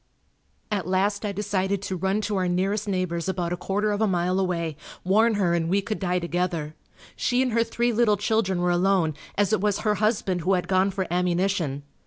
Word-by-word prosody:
At 200 Hz, -4 st, -1 dB
last 200 Hz, +3 st, +1 dB
I 205 Hz, -, -1 dB
decided 200 Hz, -1 st, -1 dB
to 190 Hz, -, -3 dB
run 190 Hz, +4 st, 0 dB
to 210 Hz, 0 st, -2 dB
our 185 Hz, -1 st, +1 dB
nearest 195 Hz, +4 st, 0 dB
neighbor's 185 Hz, -2 st, -1 dB
about 175 Hz, -2 st, -1 dB
a -, -, 0 dB
quarter 205 Hz, +4 st, -1 dB
of 205 Hz, +1 st, -1 dB
a 220 Hz, -, +3 dB
mile 180 Hz, 0 st, +1 dB
away, 170 Hz, -4 st, -1 dB, 0.3 s
warn 215 Hz, +4 st, +3 dB
her 185 Hz, -4 st, +1 dB
and 165 Hz, -1 st, 0 dB
we 195 Hz, +3 st, +3 dB
could 215 Hz, +1 st, -3 dB
die 180 Hz, -2 st, 0 dB
together. 170 Hz, -3 st, -2 dB, 0.4 s
She 250 Hz, +1 st, +1 dB
and 255 Hz, -, -1 dB
her 230 Hz, +1 st, +3 dB
three 240 Hz, +1 st, 0 dB
little 215 Hz, -2 st, +3 dB
children 200 Hz, -4 st, 0 dB
were 180 Hz, -, +2 dB
alone, 175 Hz, -2 st, +2 dB, 0.2 s
as 205 Hz, 0 st, +2 dB
it 215 Hz, -, +2 dB
was 205 Hz, -1 st, 0 dB
her 210 Hz, -1 st, +2 dB
husband 205 Hz, -5 st, +1 dB
who 185 Hz, +4 st, +1 dB
had 180 Hz, -1 st, 0 dB
gone 190 Hz, +1 st, +3 dB
for 190 Hz, -1 st, -2 dB
ammunition. 175 Hz, -5 st, 0 dB
190 Hz, 210 wpm, -25 LUFS, 180-205 Hz, 0.4 s, a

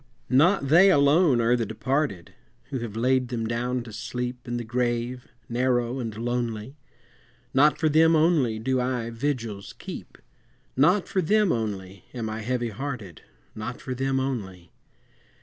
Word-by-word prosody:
Not 145 Hz, +2 st, +4 dB
they 175 Hz, +6 st, +7 dB
alone 145 Hz, -3 st, +4 dB
are 115 Hz, +2 st, +3 dB
the 120 Hz, -, 0 dB
departed, 115 Hz, -, -2 dB, 0.4 s
Who 135 Hz, -, -2 dB
have 115 Hz, -3 st, -6 dB
laid 125 Hz, +2 st, +2 dB
them 120 Hz, -2 st, -3 dB
down 120 Hz, +2 st, -1 dB
to 115 Hz, -2 st, -11 dB
sleep 125 Hz, +3 st, -5 dB
In 120 Hz, 0 st, -2 dB
the 120 Hz, -, -3 dB
grave 120 Hz, +1 st, -2 dB, 0.2 s
narrow 125 Hz, +1 st, 0 dB
and 115 Hz, -4 st, -5 dB
lonely, 120 Hz, +1 st, -3 dB, 0.8 s
Not 145 Hz, +3 st, +5 dB
for 160 Hz, -, +1 dB
them 160 Hz, +2 st, +5 dB
only 155 Hz, -8 st, +3 dB
do 130 Hz, +3 st, 0 dB
I 125 Hz, -2 st, -2 dB
vigils 115 Hz, -5 st, -3 dB
keep, -, -, -9 dB, 0.6 s
Not 180 Hz, +9 st, +3 dB
for 190 Hz, -, 0 dB
them 210 Hz, +3 st, +3 dB
only 100 Hz, -5 st, -4 dB
am 110 Hz, -3 st, -3 dB
I 110 Hz, -, -4 dB
heavy 120 Hz, +1 st, -1 dB
hearted, 110 Hz, -, -6 dB, 0.3 s
Not 110 Hz, +3 st, -6 dB
for 130 Hz, -, -5 dB
them 135 Hz, +1 st, 0 dB
only! 95 Hz, -10 st, -4 dB
125 Hz, 150 wpm, -26 LUFS, 115-135 Hz, 0.8 s, they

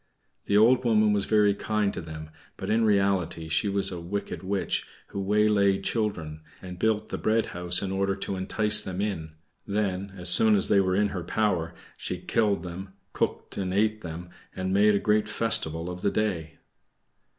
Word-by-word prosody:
The 100 Hz, -, +2 dB
old 120 Hz, +4 st, +5 dB
woman 110 Hz, -3 st, +3 dB
was 100 Hz, -1 st, +1 dB
very 105 Hz, -2 st, +3 dB
kind 105 Hz, 0 st, -1 dB
to -, -, -4 dB
them, 80 Hz, -1 st, -9 dB, 0.3 s
but -, -, -4 dB
in 115 Hz, +1 st, +3 dB
reality 95 Hz, -6 st, +1 dB
she 80 Hz, +6 st, +1 dB
was 100 Hz, 0 st, 0 dB
a 90 Hz, -, -5 dB
wicked 95 Hz, +4 st, -5 dB
witch 95 Hz, +1 st, -2 dB, 0.2 s
who 100 Hz, -, -4 dB
waylaid 100 Hz, -1 st, +2 dB
children, 85 Hz, -9 st, -2 dB, 0.2 s
and 90 Hz, -1 st, -9 dB
built 110 Hz, 0 st, 0 dB
the -, -, -4 dB
bread 110 Hz, +1 st, +1 dB
house 90 Hz, +1 st, -1 dB
in 95 Hz, -, -3 dB
order 95 Hz, 0 st, 0 dB
to 95 Hz, 0 st, -4 dB
entice 105 Hz, +3 st, +2 dB
them 95 Hz, -2 st, -5 dB
in; 90 Hz, -7 st, -3 dB, 0.3 s
then 100 Hz, -1 st, -2 dB
as 90 Hz, -1 st, 0 dB
soon 110 Hz, +4 st, +6 dB
as 100 Hz, -, +1 dB
they 100 Hz, -, +5 dB
were 95 Hz, -1 st, 0 dB
in 105 Hz, +1 st, +2 dB
her 90 Hz, -3 st, -5 dB
power 90 Hz, -4 st, -1 dB, 0.2 s
she -, -, -4 dB
killed 100 Hz, -6 st, 0 dB
them, 95 Hz, +2 st, -8 dB, 0.2 s
cooked -, -, -3 dB
and 95 Hz, -1 st, -2 dB
ate 110 Hz, +1 st, +1 dB
them, 85 Hz, 0 st, -8 dB, 0.2 s
and 95 Hz, 0 st, -2 dB
made 105 Hz, +1 st, +4 dB
a -, -, +2 dB
great 105 Hz, 0 st, +1 dB
festival 105 Hz, -8 st, 0 dB
of 90 Hz, 0 st, -6 dB
the -, -, +2 dB
day. 90 Hz, -7 st, -2 dB
100 Hz, 185 wpm, -26 LUFS, 90-105 Hz, 0.3 s, soon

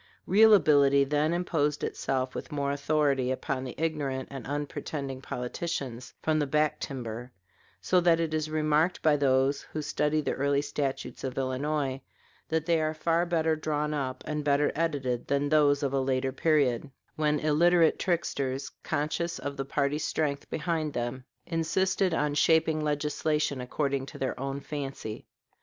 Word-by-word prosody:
Real 215 Hz, +3 st, +7 dB
ability 140 Hz, -6 st, +5 dB
then 150 Hz, +3 st, +1 dB
imposed 160 Hz, -4 st, 0 dB
itself 130 Hz, -1 st, -2 dB
with -, -, -6 dB
more 140 Hz, -1 st, -1 dB
authority 140 Hz, -2 st, +1 dB
upon 130 Hz, 0 st, -2 dB
the 125 Hz, -, -6 dB
ignorant 145 Hz, -5 st, -2 dB
and 135 Hz, -4 st, -7 dB
unpretending 145 Hz, -1 st, -4 dB
politicians 125 Hz, -1 st, -4 dB
from 155 Hz, -1 st, +2 dB
the 145 Hz, -, 0 dB
back 150 Hz, +2 st, +1 dB
timber; 120 Hz, -2 st, -5 dB, 0.5 s
so 185 Hz, -, +3 dB
that 170 Hz, -1 st, +4 dB
it 165 Hz, -2 st, -1 dB
is 155 Hz, 0 st, -1 dB
remarked 155 Hz, +2 st, +1 dB
by 155 Hz, -2 st, +5 dB
those 135 Hz, 0 st, +2 dB
who 155 Hz, -, -6 dB
study 150 Hz, +1 st, 0 dB
the 150 Hz, -, -1 dB
early 140 Hz, +1 st, +1 dB
statutes 145 Hz, -2 st, -3 dB
of 130 Hz, -1 st, -4 dB
Illinois 135 Hz, +1 st, -1 dB, 0.5 s
that 160 Hz, -1 st, 0 dB
they 165 Hz, -2 st, +2 dB
are 155 Hz, 0 st, -1 dB
far 165 Hz, +2 st, +1 dB
better 160 Hz, -2 st, +1 dB
drawn 150 Hz, -1 st, -1 dB
up, 130 Hz, -3 st, -3 dB
and 150 Hz, -1 st, -2 dB
better 145 Hz, 0 st, +2 dB
edited, 140 Hz, -7 st, -1 dB
than 140 Hz, 0 st, +1 dB
those 145 Hz, -1 st, +4 dB
of 140 Hz, -1 st, 0 dB
a 135 Hz, -, +2 dB
later 130 Hz, 0 st, 0 dB
period, 140 Hz, -3 st, +1 dB, 0.3 s
when 150 Hz, -1 st, +1 dB
illiterate 165 Hz, +2 st, +4 dB
tricksters, 140 Hz, -7 st, -1 dB
conscious 170 Hz, +3 st, -2 dB
of 140 Hz, 0 st, -5 dB
the 135 Hz, -1 st, -3 dB
party 140 Hz, +1 st, 0 dB
strength 145 Hz, -2 st, -2 dB
behind 160 Hz, -2 st, -2 dB
them, 120 Hz, +2 st, -3 dB, 0.2 s
insisted 190 Hz, +3 st, +1 dB
on 150 Hz, -2 st, 0 dB
shaping 160 Hz, +1 st, +3 dB
legislation 150 Hz, -1 st, 0 dB
according 135 Hz, +1 st, -2 dB
to -, -, -9 dB
their 130 Hz, -1 st, -3 dB
own 135 Hz, +1 st, -3 dB
fancy. 135 Hz, -7 st, -6 dB
145 Hz, 155 wpm, -28 LUFS, 135-155 Hz, 0.5 s, Real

